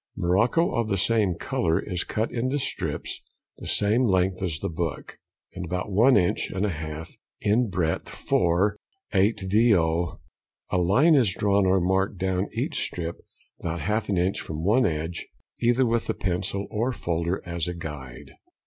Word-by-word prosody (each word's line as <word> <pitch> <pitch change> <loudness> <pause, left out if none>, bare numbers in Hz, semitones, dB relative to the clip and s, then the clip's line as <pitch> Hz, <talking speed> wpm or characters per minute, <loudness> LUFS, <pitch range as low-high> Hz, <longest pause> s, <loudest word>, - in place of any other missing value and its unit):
Morocco 110 - +2
of 115 -3 0
the 100 - +1
same 100 -2 +2
colour 80 0 0
is 90 -4 -2
cut 110 +1 -2
into 130 +4 -1
strips 135 - -2 0.4
the - - -8
same 110 +5 +2
length 95 -1 +1
as 85 -4 -1
the - - -3
book, 85 -2 -4 0.3
and 95 - -5
about 90 +4 -3
one 115 +7 +5
inch 90 -3 +1
and 95 +2 -1
a 105 - 0
half 80 0 -6 0.3
in 110 +3 +2
breadth 85 -3 -1
for 90 +4 +1 0.4
8vo.; 95 -4 +2 0.5
a - - +2
line 120 - +4
is 120 -11 +3
drawn 100 -1 +2
or 95 +1 +4
marked 95 +2 +1
down 95 +1 -1
each - - -1
strip 85 -1 -3 0.4
about 85 -1 -3
half 105 +7 -1
an 100 - +1
inch 90 +3 0
from 80 0 -5
one 110 +6 +4
edge, 80 +1 -3 0.3
either 120 +2 +3
with 115 -1 0
a - - 0
pencil 95 +1 -2
or 115 +4 0
folder, 85 -4 -2
as 85 -2 -2
a 90 - -3
guide. 70 -7 -8
95 Hz, 165 wpm, -26 LUFS, 85-105 Hz, 0.5 s, one